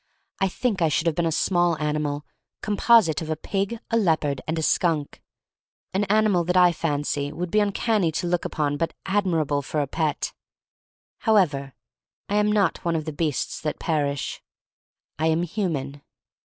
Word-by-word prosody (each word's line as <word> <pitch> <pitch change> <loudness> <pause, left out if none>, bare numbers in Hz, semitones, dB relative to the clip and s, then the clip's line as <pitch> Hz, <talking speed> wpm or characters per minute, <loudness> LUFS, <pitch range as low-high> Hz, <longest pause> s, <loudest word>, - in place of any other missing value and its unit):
I 195 - +3
think 205 0 -1
I 165 - +4
should 160 +2 0
have 165 -2 +1
been 170 0 +1
a - - 0
small 175 0 +2
ani 150 0 0
mal 145 -1 -3 0.4
composite 210 -6 +4
of 160 - -5
a 155 - 0
pig, 195 +7 -2
a 230 - +3
leopard, 155 - +1
and 160 +1 -1
a 160 - -1
skunk: 155 -3 0 0.7
an 195 +2 +1
animal 210 -3 +3
that 180 +1 +1
I 180 -1 +6
fancy 145 -3 -2
would 170 +3 -4
be 215 - +3
uncanny 205 -3 +1
to 175 - -2
look 175 0 0
upon 145 -1 -1
but 165 +2 -2
admirable 165 -8 +1
for 150 +2 -3
a 145 - +1
pet. 155 +2 -2 0.9
However, 155 - +2 0.5
I 205 - 0
am 210 0 +3
not 205 -4 +1
one 170 -1 0
of 155 -2 -2
the 155 - -4
beasts 150 -2 -2
that 150 -1 -2
perish. 145 -4 -1 0.8
I 160 - +2
am 160 +1 +2
human. 155 -7 -3
165 Hz, 175 wpm, -24 LUFS, 150-195 Hz, 0.9 s, I